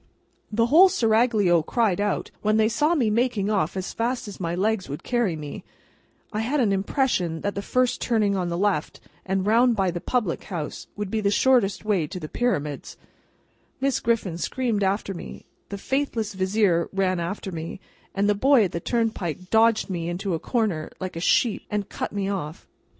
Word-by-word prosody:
The 230 +2 +2
whole 335 +10 +7
Seraglio 220 - +3
cried 205 +2 +1
out, 205 -1 -1
when 215 +1 +2
they 215 0 +4
saw 300 +8 +2
me 240 -8 +2
making 220 -3 +1
off 190 -3 0
as 185 - -4
fast 240 +1 -2
as 205 - -9
my 170 -1 -2
legs 205 0 0
would 145 - -6
carry 240 -8 0
me 150 -2 -7 0.7
(I 210 - -1
had 255 +7 0
an 225 -6 +3
impression 190 - 0
that 205 - -2
the 200 - -3
first 255 +4 0
turning 215 -4 +1
on 180 -2 -1
the 170 - -2
left, 195 -5 0 0.3
and 190 0 0
round 235 +3 +4
by 190 -3 +1
the 175 0 -5
public 220 -10 -1
house, 170 -7 -5
would 205 -2 -4
be 220 - 0
the 200 - +2
shortest 210 -3 +2
way 195 -8 +1
to 185 +2 -6
the 155 - -6
Pyramids), 150 - -2 0.8
Miss 270 0 +1
Griffin 215 -7 -1
screamed 235 0 -1
after 195 +1 0
me, 170 - -9 0.2
the 200 - -5
faithless 230 -3 -2
Vizier 190 -2 +1
ran 190 -2 0
after 190 +3 -4
me, 165 +2 -6 0.4
and 200 +1 +2
the 210 - +4
boy 260 +3 +4
at 185 - -1
the 170 - -3
turnpike 185 - -2
dodged 225 0 +4
me 170 -3 -3
into 180 +2 -2
a 165 - -1
corner, 200 -7 -1
like 185 -2 -5
a - - -3
sheep, 215 +5 +2
and 210 -1 -2
cut - - -4
me 200 -1 -2
off. 175 -5 -4
205 Hz, 190 wpm, -24 LUFS, 180-230 Hz, 0.8 s, whole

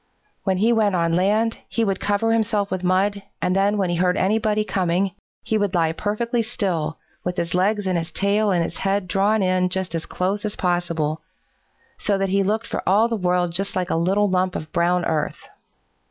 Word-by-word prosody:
When 190 -2 +1
he 225 +5 +3
went 210 -4 +2
on 170 -1 +1
land, 210 +6 +1
he 230 - 0
would 195 -2 -1
cover 205 +2 +1
himself 215 -3 +1
with 185 -1 -2
mud, 195 +3 +1 0.2
and 180 - 0
then 200 +2 +2
when 190 -3 0
he 175 - 0
heard 180 +1 +2
anybody 215 +2 +1
coming, 190 -1 0 0.3
he 220 - 0
would 200 -2 0
lie 165 -2 +2
perfectly 230 +7 -1
still, 180 -9 -2 0.3
with 180 0 -3
his 170 0 -2
legs 200 +3 +1
and 185 -2 +1
his 165 +1 -6
tail 205 +4 +1
and 175 -3 +2
his - - -5
head 195 -1 0
drawn 200 +3 +2
in 185 0 +2
just 190 0 -2
as 165 -1 -3
close 195 +3 -1
as 210 -1 -2
possible, 170 -4 -1 0.8
so 205 -1 +1
that 195 0 0
he 195 +1 +2
looked 215 +4 0
for - - -3
all 210 +4 +4
the 230 - 0
world 180 -3 +1
like - - -8
just 195 +3 -2
a 180 -2 0
little 190 +5 +2
lump 185 -1 0
of 155 - -5
brown 175 +1 +2
earth. 155 -2 -2
190 Hz, 205 wpm, -22 LUFS, 180-205 Hz, 0.8 s, all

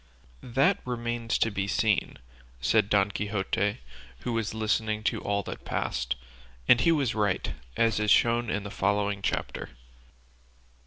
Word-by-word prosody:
"That 130 +3 +2
remains 120 -1 -2
to 115 - +1
be 100 -1 -2
seen," 105 +3 +1 0.4
said 65 +10 +2
Don 100 -1 +3
Quixote, 100 - -1 0.4
who 120 - -2
was 115 -1 -1
listening 110 0 0
to - - 0
all 100 0 -1
that - - -7
passed; 65 0 -2 0.5
and 120 - +6
he 165 - +4
was 140 -7 +1
right, 105 -4 0 0.2
as 115 -2 +3
is 105 0 +1
shown 120 +2 +4
in 105 - -1
the 100 - -7
following 100 0 0
chapter. - - -2
105 Hz, 145 wpm, -28 LUFS, 100-115 Hz, 0.5 s, and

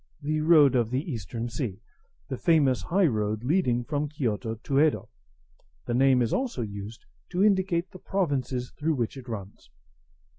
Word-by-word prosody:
[The 155 +1 0
road 155 -4 +6
of 120 -3 +2
the 135 +7 -2
Eastern 115 0 -4
Sea, 115 -4 -4 0.5
the - - -3
famous 145 -6 +3
highroad 110 - +1
leading 125 -5 +1
from 145 +2 -2
Kiyoto 115 -6 -2
to 115 +5 -7
Yedo. 155 0 +2 0.8
The - - -2
name 130 0 +4
is 115 - -1
also 250 - -1
used 105 +1 -8 0.2
to 180 +2 +1
indicate 190 -4 +2
the 185 - -11
provinces 135 -11 -2
through 160 +1 -1
which 120 -2 -2
it 130 -2 -10
runs. 100 - -8
130 Hz, 155 wpm, -27 LUFS, 115-155 Hz, 0.8 s, road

